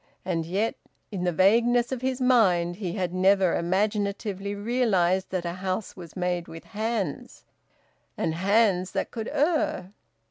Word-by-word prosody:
And 165 -3 -1
yet, 200 +6 0 0.4
in 185 -3 -3
the 180 - +2
vagueness 235 +8 +3
of 260 -2 -3
his 260 0 -1
mind, 185 -9 +3
he 185 -5 -4
had 180 -3 -2
never 190 -1 +3
imaginatively 200 +2 -1
realised 200 -5 +1
that 185 -2 -3
a 170 - -2
house 185 +2 -3
was 170 -4 -11
made 180 -1 -1
with 165 0 -10
hands, 215 -6 -4 0.7
and 160 - -1
hands 190 0 +2
that - - -2
could 225 -2 -5
err. 295 - 0
195 Hz, 145 wpm, -26 LUFS, 180-220 Hz, 0.7 s, vagueness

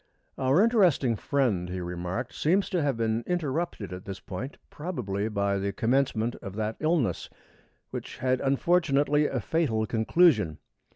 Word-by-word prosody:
"Our 135 +9 +4
interesting 180 - +3
friend," 110 -9 0
he 90 +1 -4
remarked, 90 +7 -4
"seems 185 +6 +1
to 180 - +1
have 140 -5 0
been 115 0 0
interrupted 160 - -2
at 90 +1 -8
this 100 -1 -6
point, 120 +9 -6
probably 110 - -3
by 100 -2 0
the 100 +1 -1
commencement 120 +1 +1
of 95 0 -8
that 110 0 -2
illness 155 -4 0 0.6
which - - -6
had, 130 0 0
unfortunately, 145 0 +2
a - - -2
fatal 130 -10 0
conclusion. 110 - +3
125 Hz, 140 wpm, -27 LUFS, 100-150 Hz, 0.6 s, Our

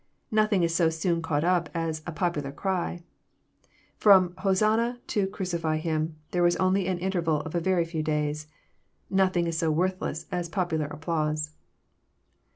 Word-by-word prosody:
Nothing 215 -4 +3
is 165 -1 +1
so 170 -1 +3
soon 165 +1 0
caught 160 -2 0
up 175 -2 +2
as 165 -2 -2
a - - -2
popular 160 -5 -2
cry. 175 +1 -2 1.0
Prom 190 -4 +7
^'Hosanna 215 +6 +1
" - - -38
to 200 -2 +2
Crucify 170 -5 -2
Him 155 0 -1
" - - -39
there 175 - +1
was 175 0 +4
only 185 0 +2
an 185 -2 0
interval 170 -4 0
of 160 - -7
a 175 - +1
very 175 0 +1
few 165 -1 -3
days 150 0 -1 0.6
I - - -3
Nothing 185 -2 +3
is 165 -1 -1
so 165 - +1
worthless 165 -1 -1
as 175 -2 -2
popular 160 -4 -1
applause.. 150 -1 -2
170 Hz, 165 wpm, -27 LUFS, 160-185 Hz, 1.0 s, Prom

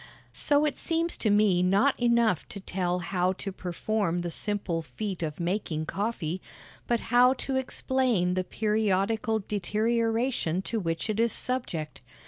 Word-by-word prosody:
So 290 0 +3
it 295 -3 -1
seems 335 +1 0
to 220 - +1
me 205 -3 +4
not 200 +10 +4
enough 235 -7 +2
to 200 - -6
tell 180 -2 -1 0.2
how 180 0 +2
to 195 +1 -6
perform 185 0 -1
the 175 -1 -3
simple 195 -3 -1
feat 190 +3 -5
of 155 -1 -3
making 170 -3 -1
coffee, 190 -3 -2 0.5
but 235 -1 +2
how 250 +1 +7
to 265 0 -4
explain 255 -7 +1
the 185 0 0
periodical 215 +2 +1
deterioration 225 -1 0
to 225 - -2
which 165 -2 -2
it 215 0 -1
is 230 0 +3
subject. 200 -12 -3
210 Hz, 145 wpm, -28 LUFS, 180-235 Hz, 0.5 s, how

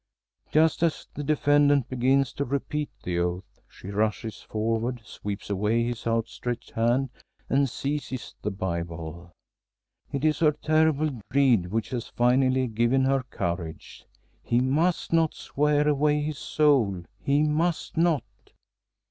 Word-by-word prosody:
Just 160 +1 +3
as 165 -2 0
the 145 - -5
defendant 145 -2 +3
begins 130 +1 +2
to 140 - -2
repeat 140 +2 -2
the 90 -1 -1
oath, 90 +2 -3
she 95 - -11
rushes 105 -1 -1
forward, 115 +3 -2
sweeps 100 0 -6
away 105 +4 +1
his 120 -1 -3
outstretched 115 +1 -2
hand, 120 +3 +1 0.4
and 135 0 +3
seizes 135 -2 -4
the - - -1
Bible. 85 -3 -5 0.8
It 140 +2 -2
is 155 -2 +2
her 155 -2 +4
terrible 155 -3 +1
dread 125 -9 +3
which 115 0 -1
has 120 -3 -3
finally 130 +2 +2
given 120 +3 +2
her 135 0 +2
courage. 85 -3 -5 0.3
He 120 - +1
must 155 +8 +1
not 165 -1 +3
swear 150 +1 +1
away 150 0 +2
his 150 -1 -4
soul; 125 - +2 0.2
he 140 +2 +3
must 155 +3 0
not! 165 -3 +2
130 Hz, 130 wpm, -26 LUFS, 110-150 Hz, 0.8 s, her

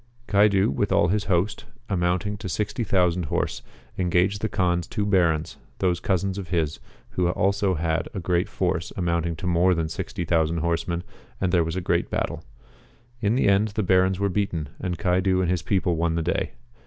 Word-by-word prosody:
Caidu 100 -4 +4
with 70 - -1
all 85 - +4
his 105 +2 0
host, 95 +2 0 0.2
amounting 90 +2 0
to 95 - -6
60,000 90 -4 0
horse, - - -2 0.4
engaged 90 +3 +2
the 110 - -1
Kaan's 90 -3 0
two 105 -3 -2
Barons, 85 -6 +1 0.2
those 90 -2 +1
cousins 95 +1 -1
of 95 - -6
his, 80 -3 -1 0.3
who 90 - 0
had 90 - +1
also 100 0 +1
a 80 +3 -2
great 90 0 0
force 90 -2 -1
amounting 85 -2 0
to 90 - -7
more 90 +1 +3
than 80 -1 -1
60,000 80 0 -1
horsemen, 85 +1 -1 0.4
and 95 -2 0
there 85 -2 +4
was 80 +1 -3
a 95 - -1
great - - 0
battle. - - -2 0.8
In 105 +2 +2
the 130 - +2
end 100 +2 +4
the 105 0 -2
Barons 95 0 +3
were 100 - +2
beaten, 90 -6 -2
and 90 -1 -3
Caidu 95 0 +2
and 90 -1 +1
his 90 -3 0
people 90 +1 +1
won 80 0 0
the 85 - 0
day. - - -1
90 Hz, 180 wpm, -25 LUFS, 85-95 Hz, 0.8 s, Caidu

